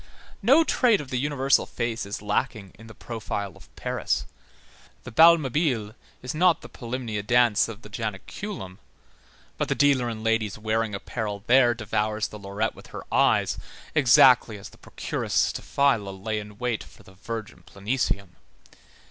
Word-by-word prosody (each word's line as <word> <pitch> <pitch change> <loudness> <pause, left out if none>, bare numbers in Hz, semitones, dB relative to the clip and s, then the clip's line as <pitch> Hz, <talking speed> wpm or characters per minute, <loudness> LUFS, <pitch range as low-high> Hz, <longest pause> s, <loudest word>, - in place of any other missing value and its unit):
No 270 +10 +6
trait 245 -8 +3
of 140 -3 -8
the 125 - 0
universal 140 -1 +2
face 120 -3 -3
is 100 +1 -6
lacking 105 -1 -2
in 110 +3 -15
the 110 - -13
profile 105 -4 -5
of - - -17
Paris. - - -2 0.8
The 125 - -9
bal 165 +8 +8
Mabile 130 -7 -1 0.3
is 125 - -4
not 170 +1 +3
the - - -10
polymnia 120 -3 -4
dance 120 0 +3
of 115 0 -9
the 105 - -11
Janiculum, 105 - -6 0.8
but - - -1
the - - +1
dealer 140 -4 +3
in 110 -1 -6
ladies' 115 -2 0
wearing 110 0 -1
apparel 105 0 -5
there 120 -1 +5
devours 110 -1 -1
the 105 - -10
lorette 100 +3 -2
with - - -14
her - - -8
eyes, - - +3 0.3
exactly 125 -5 +5
as 100 - -10
the - - -20
procuress - - -5 0.2
Staphyla 135 -8 +1
lay 105 +3 -4
in 105 0 -10
wait 120 -2 -2
for - - -18
the 95 - -17
virgin 110 +3 -7
Planesium. 100 -3 -3
115 Hz, 155 wpm, -25 LUFS, 105-130 Hz, 0.8 s, bal